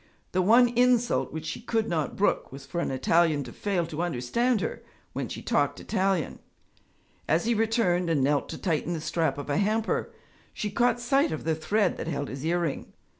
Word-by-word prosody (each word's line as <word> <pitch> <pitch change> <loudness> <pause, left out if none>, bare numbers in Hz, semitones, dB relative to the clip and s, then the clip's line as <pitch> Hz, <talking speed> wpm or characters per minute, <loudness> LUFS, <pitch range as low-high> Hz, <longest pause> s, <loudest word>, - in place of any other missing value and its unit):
The 185 - +2
one 235 +6 +6
insult 245 0 +2
which 160 0 -6
she - - -5
could 225 -1 0
not 160 -4 -1
brook 205 - +1
was 135 +1 -9
for 170 +5 -3
an - - -1
Italian 155 +2 +2
to - - -10
fail 190 -5 -1
to 160 0 -4
understand 175 - 0
her - - -3 0.3
when - - -3
she - - -7
talked - - +1
Italian. 190 -4 -1 0.9
As 165 +5 +2
he 235 - +2
returned 220 -6 +1
and 150 -5 +2
knelt 145 +1 +1
to - - -5
tighten 170 -1 -1
the 165 - -3
strap 160 0 0
of 145 - -6
a 145 0 0
hamper, 215 +2 0 0.4
she 210 - -3
caught 240 +3 +2
sight 270 +4 +2
of 155 - -4
the 160 - +1
thread 195 +5 0
that - - -5
held 145 -4 -3
his 135 +1 -6
earring. 170 -2 -1
175 Hz, 195 wpm, -27 LUFS, 155-225 Hz, 0.9 s, one